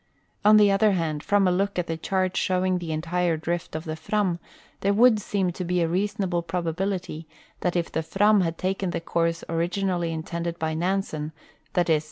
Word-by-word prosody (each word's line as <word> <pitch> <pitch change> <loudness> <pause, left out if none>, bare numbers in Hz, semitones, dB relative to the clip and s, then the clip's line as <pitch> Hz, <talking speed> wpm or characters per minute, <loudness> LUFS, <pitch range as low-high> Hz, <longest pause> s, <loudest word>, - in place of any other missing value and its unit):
On 210 +1 +7
the 205 -1 +6
other 205 +1 +4
hand, 160 -4 -1
from 200 +1 +3
a - - +3
look 195 +2 0
at 180 - 0
the 165 - -3
chart 185 +2 -1
showing 185 0 +1
the 170 -2 -5
entire 170 +1 0
drift 170 +1 -3
of 155 - -3
the 155 -1 -3
Fram, 180 +1 -1 0.4
there 200 +1 +1
would 230 0 +6
seem 190 -3 0
to 180 - -5
be 180 0 0
a - - +1
reasonable 190 0 0
probability 175 0 -3 0.3
that 180 -1 -1
if 170 -1 -1
the 160 - -1
Fram 205 +5 +3
had 165 -2 -1
taken 190 0 -1
the - - -2
course 165 0 -1
originally 175 +1 -1
intended 170 +1 -4
h}'' 160 -1 -2
Nansen, 165 -3 -2 0.4
viz. 165 -3 +3
175 Hz, 190 wpm, -25 LUFS, 165-195 Hz, 0.4 s, On